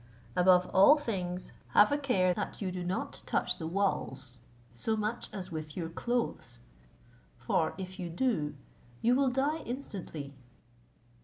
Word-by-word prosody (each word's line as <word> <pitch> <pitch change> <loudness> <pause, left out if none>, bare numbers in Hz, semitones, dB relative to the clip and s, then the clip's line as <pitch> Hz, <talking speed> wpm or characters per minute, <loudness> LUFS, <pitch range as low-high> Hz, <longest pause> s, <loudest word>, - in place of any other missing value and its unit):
Above 180 0 +5
all 240 +11 +8
things, 185 -9 -3 0.2
have 210 +4 +7
a 285 - +3
care 190 -10 +2
that 205 - -4
you 190 -3 -2
do 180 0 -4
not 180 +2 -3
touch - - 0
the 160 - -3
walls, 165 -9 -2 0.3
so 220 - -1
much 215 +3 -2
as 185 -2 -4
with 155 0 -6
your 165 -2 -2
clothes; 200 - -2 0.8
for 140 +6 0
if 185 0 -7
you 175 -2 -3
do, 165 - 0 0.5
you 240 - +5
will 270 +1 +3
die 280 +5 +1
instantly. 190 - -6
185 Hz, 145 wpm, -31 LUFS, 165-235 Hz, 0.8 s, all